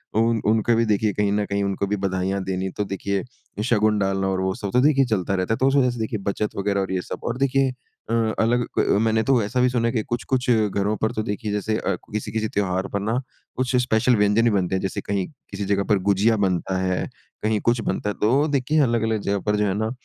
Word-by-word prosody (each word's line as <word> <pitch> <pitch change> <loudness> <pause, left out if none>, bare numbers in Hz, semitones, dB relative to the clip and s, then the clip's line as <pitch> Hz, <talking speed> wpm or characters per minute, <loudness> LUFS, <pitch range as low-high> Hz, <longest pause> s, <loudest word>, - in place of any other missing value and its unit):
उन 115 0 +2
उनको 110 +2 +3
भी 115 0 +2
देखिए 105 0 +1
कहीं 105 -1 +1
न 105 0 +1
कहीं 100 0 -1
उनको 100 0 -1
भी 105 - 0
बधाइयाँ 95 0 -1
देनी 95 0 -2
तो 105 - +1
देखिए, 100 0 -2 0.4
शगुन 110 -2 +2
डालना 95 0 0
और 95 -1 0
वो 95 0 0
सब 100 - -4
तो 125 - +4
देखिए 140 -2 +4
चलता 95 -4 -1
रहता 95 +4 0
है। - - -1
तो 130 - +2
उस 135 - +2
वजह 130 -2 +4
से 120 - -7
देखिए 110 -1 -2
बचत 105 +1 -1
वग़ैरह 100 0 0
और 95 - -3
ये 90 - 0
सब - - -7
और 120 +1 -2
देखिए 135 -1 +2 0.4
अ, - - -1 0.3
अलग 120 +2 +2
क 100 - +3
मैंने 110 0 +2
तो 125 -1 +3
ऐसा 125 +5 -1
भी 125 - +4
सुना 120 -2 0
है - - +1
कि 110 - +1
कुछ, 120 0 -3
कुछ 125 -1 -1
घरों 105 -1 +1
पर 110 - 0
तो 110 - -2
देखिए 105 +1 -3
जैसे 110 +1 -1
अ, 100 - -1 0.2
किसी-किसी 110 +1 -2
त्योहार 95 -2 -1
पर 100 - 0
ना 110 +5 -1 0.4
कुछ 130 0 0
स्पेशल 120 +1 +2
व्यंजन 105 +2 +3
भी - - +5
बनते 95 -2 0
हैं। 95 - -1
जैसे 95 - -3
कहीं 100 -2 -2 0.2
किसी 100 0 -4
जगह 100 0 +1
पर 105 -2 +4
गुजिया 105 +3 +3
बनता 95 -1 0
है, 95 -1 -1 0.4
कहीं 110 -1 +1
कुछ 120 -1 +1
बनता 105 - -2
है - - -3
तो 110 +3 +3
वो 145 +3 +3
देखिए 145 +2 +1
अलग-अलग 110 -3 +1
जगह 100 0 -1
पर 105 - +3
जो 105 - +2
है 95 - 0
ना 110 +2 -1
105 Hz, 250 wpm, -23 LUFS, 100-115 Hz, 0.4 s, भी